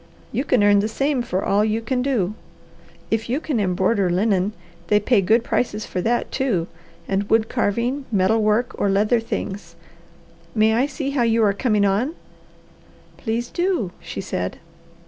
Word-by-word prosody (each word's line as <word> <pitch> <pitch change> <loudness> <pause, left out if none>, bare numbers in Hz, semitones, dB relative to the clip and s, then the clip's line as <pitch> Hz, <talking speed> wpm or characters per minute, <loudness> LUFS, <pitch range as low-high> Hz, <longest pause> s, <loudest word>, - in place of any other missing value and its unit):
You 260 - -1
can 250 -7 +3
earn 205 0 +5
the 205 - +1
same 270 +3 0
for 190 -5 -2
all 205 +1 +3
you 215 +1 0
can 250 +3 -1
do. 235 -8 0 0.8
If 225 +1 -1
you 260 +5 +1
can 295 -7 -2
embroider 190 +1 +1
linen, 195 +2 +1 0.3
they 210 +2 +4
pay 210 0 +3
good 225 +5 +3
prices 215 -4 -1
for 180 - -3
that, 240 +5 0
too 220 -11 0 0.4
and 200 +1 -1
wood 225 0 +3
carving, 240 +4 -1
metal 210 +2 +2
work, 215 +3 +1
or 200 - +2
leather 210 +4 +3
things. 205 -3 -5 0.8
May 220 0 +4
I 250 +5 +2
see 280 -1 -4
how 275 -3 0
you 230 -1 +3
are 205 -2 +3
coming 210 -1 +1
on?" 220 - 0 1.0
"Please 235 +1 -2
do," 350 - 0
she - - -6
said. 90 - -3
220 Hz, 165 wpm, -22 LUFS, 200-245 Hz, 1.0 s, earn